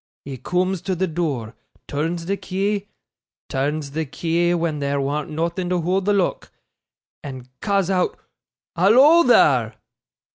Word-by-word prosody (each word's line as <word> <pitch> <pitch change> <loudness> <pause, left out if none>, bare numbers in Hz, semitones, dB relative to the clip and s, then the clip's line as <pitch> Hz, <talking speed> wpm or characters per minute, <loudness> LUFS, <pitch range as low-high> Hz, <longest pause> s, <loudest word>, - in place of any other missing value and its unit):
He 135 -1 -6
cooms 180 +3 -1
to 190 - 0
the 185 +2 0
door, 155 -10 -3 0.3
turns 165 +4 -2
the 195 +3 0
key 200 +1 -2 0.6
turns 145 +2 -2
the 160 +3 -2
key 170 +4 0
when 165 -3 -1
there 140 0 -1
warn't 145 +2 -2
nothing 170 +3 -2
to 180 -1 +1
hoold 185 +3 0
the 205 - +3
lock 195 -3 -1 0.7
and 130 -3 -8
ca's 195 -3 +1
oot 190 - +1 0.6
"Hallo, 260 - +6
there!" 130 - +4
170 Hz, 140 wpm, -22 LUFS, 145-190 Hz, 0.7 s, Hallo